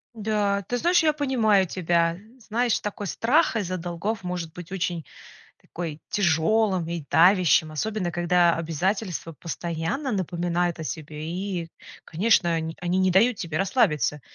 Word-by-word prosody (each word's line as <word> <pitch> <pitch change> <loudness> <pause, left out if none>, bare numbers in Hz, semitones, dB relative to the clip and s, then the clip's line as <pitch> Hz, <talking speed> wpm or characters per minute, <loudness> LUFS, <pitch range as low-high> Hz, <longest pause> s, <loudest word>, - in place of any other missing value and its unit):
Да, 205 -2 0
ты 245 - -1
знаешь, 345 +5 +3
я 310 -1 +3
понимаю 230 -10 +2
тебя. 170 -1 +1 0.2
Знаешь, 235 +1 0
такой 205 -1 -5
страх 255 - +2
из-за 185 -4 -2
долгов 180 +5 -4
может 175 -3 -4
быть 175 -1 -10
очень 175 -3 -2 0.6
такой 160 -3 -6
тяжелым 190 0 +1
и 170 -3 -4
давящим, 175 -2 +5
особенно 190 +3 -2
когда 175 0 +3
обязательства 170 +2 -2
постоянно 170 - -3
напоминают 175 -3 -1
о 160 - -5
себе, 155 -1 -6
и, 180 -2 -4 0.4
конечно, 175 -1 +2
они 160 0 -3
они 180 +1 0
не 185 0 +3
дают 220 +6 +4
тебе 165 -5 -3
расслабиться. 150 - +1
180 Hz, 140 wpm, -25 LUFS, 165-210 Hz, 0.6 s, давящим